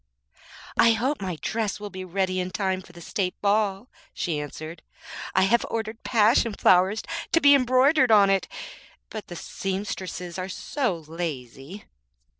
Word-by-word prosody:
'I 230 0 +7
hope 255 +4 -1
my 185 -3 -3
dress 215 +4 -2
will 205 -1 -7
be 185 -1 -6
ready 185 0 -1
in 180 0 -2
time 190 -1 -1
for 175 - -16
the 175 -1 -13
State 180 +2 -3
ball,' 205 +1 +1 0.3
she 160 -5 -2
answered; 155 +3 -7 0.5
'I 185 - +5
have 235 +5 +3
ordered 220 0 -4
passion 225 -1 +3
flowers 190 +4 +3 0.3
to 330 - +4
be 285 -2 +7
embroidered 255 +1 +4
on 205 -3 +6
it; 195 -1 +1 0.6
but 215 -2 -7
the 175 - -8
seamstresses 185 0 -5
are 185 +1 -4
so 245 - -2
lazy.' 155 - -6
195 Hz, 150 wpm, -25 LUFS, 180-225 Hz, 0.6 s, I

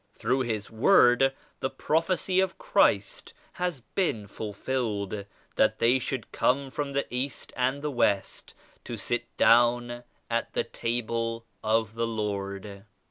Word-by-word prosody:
Through 125 +4 0
74 115 - 0
His 105 0 -8
Word 125 - +5 0.3
the 130 - -1
prophecy 180 +5 +1
of 190 - +1
Christ - - +1 0.2
has 180 -7 -2
been 115 - 0
ful 105 +1 -6
filled; 105 -3 -2 0.3
that 110 0 +3
they 120 +4 +4
should 130 -2 -4
come 135 +1 +1
from 140 0 -3
the 140 0 0
East 130 +2 -3
and 130 +3 0
the 150 - -1
West 100 -6 0 0.3
to - - -6
sit - - -2
down 120 +1 +4 0.2
at 115 0 -2
the - - +1
Table 115 0 -2 0.2
of 110 0 +1
the 115 0 -1
Lord. 100 -2 -4
120 Hz, 140 wpm, -28 LUFS, 110-135 Hz, 0.3 s, Word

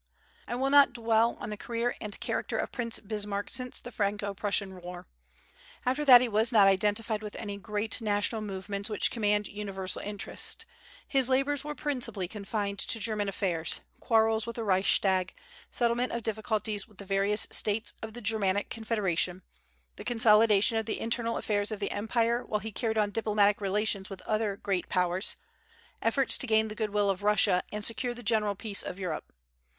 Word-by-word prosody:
I 240 - -3
will 270 +2 0
not 285 -3 +6
dwell 230 -1 +2
on - - -6
the 210 - -5
career 235 +2 -2
and 210 -2 -5
character - - -2
of - - -2
Prince 235 -3 -2
Bismarck 205 -1 -3
since 250 -1 -5
the 245 - -10
Franco 205 -2 -1
Prussian 195 -2 -2
war. 180 0 -8 0.8
After 260 +4 +1
that 250 -3 +10
he 250 - +1
was 220 +1 +2
not 210 -4 +6
identified 210 +3 +1
with 210 -1 -7
any 205 -2 -5
great 210 +3 -1
national 210 +1 0
movements 200 0 -4
which 210 - +2
command 210 -2 +1
universal 195 -2 -4
interest. 205 - -1 0.4
His 265 -2 +2
labors 275 +2 +1
were 300 0 -5
principally 240 -11 -2
confined 200 0 -4
to 225 - +1
German 210 -2 -1
affairs, 175 -5 -1 0.2
quarrels 225 -1 +2
with 235 - -5
the 230 - -3
Reichstag, 190 -1 +2 0.3
settlement 240 +1 0
of 235 -1 -3
difficulties 215 -1 -2
with 210 -3 -23
the 200 - -9
various 200 +2 +4
States 215 +2 +3
of 220 0 -7
the 240 - -8
Germanic 205 -2 0
Confederation, 190 -5 -1 0.5
the - - -8
consolidation 225 -1 +4
of 220 - -5
the 220 - -2
internal 230 0 -1
affairs 205 0 -1
of 215 - -4
the 200 - -2
empire 230 +3 0
while 210 - -2
he 220 +1 -6
carried 220 +1 -2
on 210 -1 +2
diplomatic 210 -2 +2
relations 200 0 0
with 195 -2 -9
other 215 -2 -1
great 190 -3 -2
Powers, 180 +2 +1 0.7
efforts 255 +4 +1
to 260 - 0
gain 220 -1 +3
the - - -6
good 215 0 -2
will 205 -1 +2
of 190 0 -5
Russia 205 -3 +4
and 210 0 -4
secure 240 +2 0
the 245 - -10
general 210 -2 +1
peace 200 0 -1
of 180 - -5
Europe. 180 -5 -5
210 Hz, 180 wpm, -29 LUFS, 200-230 Hz, 0.8 s, that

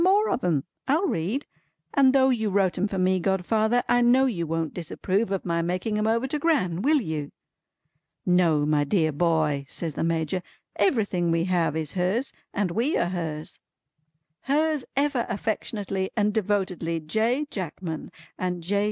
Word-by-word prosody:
More 405 +4 +4
of - - -1
'em! 155 -6 +1 0.2
I'll 310 +8 +2
read. 215 - -1 0.5
And 270 -2 +5
though 265 0 +4
you 220 -4 0
wrote 195 -2 +2
'em 195 - 0
for 195 - -4
me, 185 0 +2
godfather, 215 +6 +1
I 245 - +3
know 250 +2 +5
you 175 -10 -1
won't 165 -1 -2
disapprove 185 +5 -1
of 195 -1 -2
my 170 -1 0
making 185 +5 -1
'em 215 - +1
over 230 +3 +2
to 300 - -1
Gran; 230 - +1
will 295 +5 +4
you?" 155 -6 -4 0.9
"No, 170 -5 +3
my 150 -1 +2
dear 155 +1 +1
boy," 155 -2 +1
says 160 +3 -4
the - - -2
Major. 165 +2 0 0.3
"Everything 200 - +1
we 165 0 +2
have 175 -4 +1
is 155 -2 -3
hers, 190 +9 0 0.2
and 200 -4 -1
we 235 - +1
are 175 - +1
hers." 160 -4 -5 0.8
"Hers 300 0 0
ever 275 -3 +1
affectionately 200 -2 -2
and 210 -1 +2
devotedly 185 -5 -1
J. 225 - 0
Jackman, 170 -3 -5 0.3
and 180 -2 -2
J. 200 +4 +1
190 Hz, 165 wpm, -26 LUFS, 165-235 Hz, 0.9 s, And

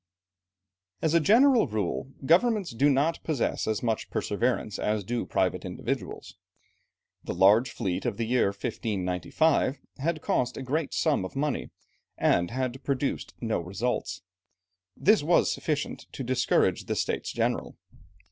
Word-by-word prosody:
As 160 - +2
a 170 - +6
general 230 - +5
rule 110 +4 -3
governments 200 - +3
do 135 +5 +3
not 145 +4 +1
possess 150 -7 -1
as 110 +1 -1
much 115 -2 -1
perseverance 110 -1 -1
as 105 -1 0
do 120 +5 -3
private - - 0
individuals. - - -5 0.9
The - - -4
large 105 +7 +5
fleet 95 -5 -3
of - - -2
the 115 - -1
year 125 -1 +2
1595, 105 - 0 0.2
had 155 +2 -1
cost 125 -1 0
a 135 - -5
great 145 +4 -2
sum 155 - +1
of 95 - -7
money, 145 0 -1 0.5
and 85 0 +2
had 130 +2 -3
produced 135 0 -2
no 115 -5 0
results; 100 +9 -3 0.7
this 215 +2 +4
was 165 +4 +3
sufficient 150 -2 -3
to 135 - -5
discourage 125 0 +1
the - - -2
States - - -2
General. - - -2
130 Hz, 140 wpm, -27 LUFS, 110-150 Hz, 0.9 s, a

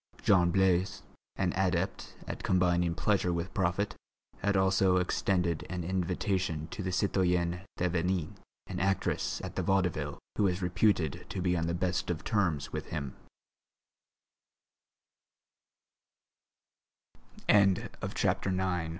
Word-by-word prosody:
Jean 90 -4 +5
Blaise, 95 0 +2 0.3
an 90 -3 0
adept 95 0 -1
at - - -5
combining 90 -2 +2
pleasure 95 -2 +1
with 85 +1 -3
profit, 95 +2 0 0.5
had 100 -1 +1
also 95 -1 +3
extended 90 -2 0
an 90 -2 -3
invitation 90 -2 -1
to - - -6
the 95 - -2
citoyenne 90 -2 +1 0.2
Thévenin, 90 -1 0 0.3
an - - -5
actress 95 +1 0
at - - -6
the - - 0
Vaudeville, 90 -6 0 0.2
who - - +3
was 90 -1 +1
reputed 90 -4 +1
to - - -4
be 90 0 +1
on 85 -1 0
the 85 - -1
best 90 +1 -1
of 85 -3 -2
terms 85 -9 0
90 Hz, 105 wpm, -30 LUFS, 85-95 Hz, 0.5 s, Jean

